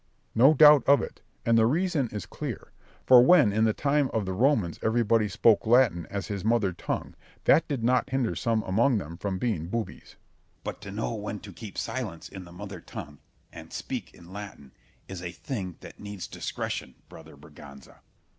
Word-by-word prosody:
Berg. - - -42
No 135 +7 +6
doubt 150 -1 +8
of 140 +1 +5
it; - - -8 0.2
and 115 0 +4
the 110 - +4
reason 160 -2 0
is 105 -4 -6
clear; - - -7 0.3
for 125 -1 +8
when 130 - +5
in 110 +1 +3
the 110 - +3
time 145 +1 +1
of 110 -3 0
the 95 - -3
Romans 110 - +1
everybody 115 -1 +2
spoke 110 +2 +3
Latin 115 -8 +3
as 100 -1 -4
his 100 -3 -5
mother 110 -4 +1
tongue, - - -4 0.3
that 165 - +4
did 135 -6 -3
not 125 +2 +2
hinder 130 -3 0
some 115 -2 0
among 115 +6 +2
them 85 -4 -6
from 95 +1 -3
being 90 -7 -2
boobies. 115 +3 -5
Scip. - - -29 0.5
But - - -6
to - - -8
know 60 - -3
when - - -5
to - - -11
keep 105 -3 -10
silence 110 -11 -4
in 95 -2 -9
the 85 - -14
mother 95 0 -8
tongue, 75 -2 -9 0.3
and - - -11
speak - - -6
in 85 +2 -14
Latin, 95 -10 -9 0.4
is 95 -3 -7
a 90 -1 -5
thing 95 - -5
that - - -12
needs 105 -2 -7
discretion, 65 - -5
brother - - -14
Berganza. 70 -1 -14
110 Hz, 195 wpm, -27 LUFS, 95-125 Hz, 0.5 s, doubt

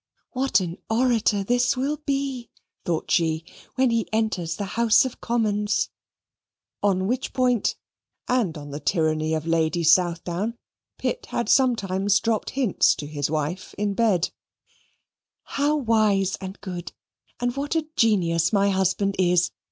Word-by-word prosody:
"What 260 -5 +2
an 175 0 -5
orator 225 -3 +2
this 245 +4 +1
will 280 +4 -1
be," 275 -3 -2 0.4
thought 165 -2 -2
she, 160 -1 +1 0.3
"when 260 -2 +3
he 230 -1 0
enters 215 -7 -1
the 205 - -4
House 230 +1 +4
of 255 - -6
Commons" 210 -3 0 0.9
(on 190 -2 +1
which 250 +5 -2
point, 250 -4 +1 0.5
and 225 -11 0
on 145 -1 -9
the 145 - -5
tyranny 155 -1 0
of 155 0 -3
Lady 165 0 +1
Southdown, 175 +6 +2 0.4
Pitt - - -3
had - - -2
sometimes 205 -6 +2
dropped 225 -1 -1
hints 250 -9 +3
to 150 - -6
his 145 -1 -3
wife 155 +4 -3
in 205 -1 0
bed); 195 -6 +1 1.1
"how 290 +2 0
wise 215 -7 +2
and 190 +1 -7
good, 180 -3 -6 0.5
and 245 0 -1
what 285 +3 -2
a 320 -1 +1
genius 175 - +2
my 200 -1 +3
husband 190 +1 +1
is! 180 -1 +3
200 Hz, 140 wpm, -24 LUFS, 175-240 Hz, 1.1 s, House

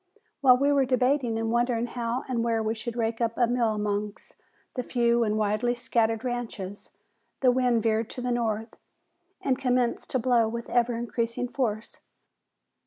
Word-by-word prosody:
While 255 -3 +6
we 280 +2 +2
were 280 -1 +4
debating 255 -2 +1
and 225 0 -1
wondering 240 0 +1
how 240 0 -3
and 240 -3 -1
where 230 -1 +1
we 220 0 0
would 235 - -3
rake 230 0 -1
up 230 -1 0
a 245 - +4
meal 235 -2 +1
amongst 210 0 -3 0.4
the 250 - -2
few 235 -1 +2
and 215 -1 0
widely 215 +3 +1
scattered 225 -2 0
ranches, 225 -6 -5 0.5
the 255 -2 +5
wind 245 -3 +2
veered 225 0 +1
to 250 - -6
the 250 0 -1
north 225 -2 -1 0.7
and 265 -1 +1
commenced 250 -2 0
to - - 0
blow 240 -2 +3
with 235 +1 -5
ever 240 0 +2
increasing 235 +1 -2
force. 230 -4 -3
235 Hz, 170 wpm, -27 LUFS, 225-250 Hz, 0.7 s, While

